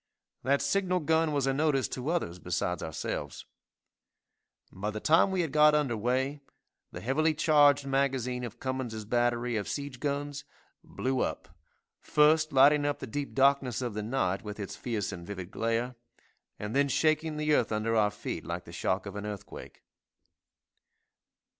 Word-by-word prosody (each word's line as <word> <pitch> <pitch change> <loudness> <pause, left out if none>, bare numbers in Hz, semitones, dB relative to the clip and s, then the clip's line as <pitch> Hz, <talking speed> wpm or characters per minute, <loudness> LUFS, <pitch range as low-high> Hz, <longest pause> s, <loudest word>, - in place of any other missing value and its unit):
That 140 +2 +1
signal 185 +3 +1
gun 160 +1 +2
was 140 -3 0
a 135 - +1
notice 135 -4 +1
to 130 +3 -4
others 125 - -2
besides 90 0 -2
ourselves. 75 -2 -5 1.3
By 100 +3 -4
the 110 0 -4
time 165 - +4
we 190 -1 0
had 160 -5 -2
got 150 0 +6
under 140 -6 +1
weigh, 130 +6 -1 0.5
the - - -8
heavily 155 +6 +1
charged 145 -2 +4
magazine 135 -2 0
of 120 - -7
Cummins' 130 -5 -4
battery 120 +1 0
of 100 - -3
siege 140 -3 -5
guns, 145 +1 -3 0.4
blew 130 0 -2
up, - - -2 0.5
first 155 +1 +3
lighting 145 +2 +6
up 145 0 0
the - - -6
deep 140 +4 -5
darkness 135 -3 +3
of 120 -4 -3
the 105 - -3
night 105 -5 -1
with 105 0 -7
its 100 - -5
fierce 110 -5 -3
and 85 -2 -8
vivid 95 -2 -6
glare, 115 +3 -1 0.6
and 105 +3 -5
then 140 0 +3
shaking 155 +2 +1
the 150 0 +1
earth 120 -6 +2
under 110 +1 0
our 105 -2 +4
feet 105 - -6
like - - -5
the - - -11
shock 95 +3 -1
of 100 0 -7
an 105 0 -5
earthquake. 105 -2 -9
130 Hz, 165 wpm, -29 LUFS, 110-145 Hz, 1.3 s, got